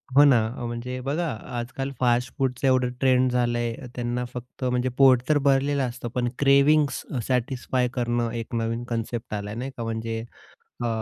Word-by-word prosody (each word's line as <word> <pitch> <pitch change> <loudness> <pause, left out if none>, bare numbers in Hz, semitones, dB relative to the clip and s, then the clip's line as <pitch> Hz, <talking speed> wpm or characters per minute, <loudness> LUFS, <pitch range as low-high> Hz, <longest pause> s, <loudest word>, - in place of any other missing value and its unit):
हो 145 - +9
ना. 135 -5 +6 0.3
म्हणजे 120 +2 -4
बघा, 155 +6 -1 0.3
आजकाल 135 +3 -4
फास्टफूडचा 125 +2 +1
एवढं 130 -1 +3
ट्रेंड 130 -1 +3
झालंय, 120 -1 0 0.2
त्यांना 120 0 -2
फक्त 125 +1 -8
म्हणजे 125 0 +1
पोट 130 -3 +6
तर 155 - +5
भरलेलं 140 +1 +3
असतं, 125 -1 -4
पण 125 -1 +1
क्रेविंग्स 140 +1 +4 0.3
सॅटिस्फाय 125 0 0
करणं, 120 -1 0
एक 115 0 -5
नवीन 115 +1 -1
कन्सेप्ट 115 -1 -3
आलाय, 105 0 -4
नाही 130 +3 -4
का. 115 - -3
म्हणजे 115 0 -3 0.6
अ, - - +1
125 Hz, 155 wpm, -25 LUFS, 120-135 Hz, 0.6 s, हो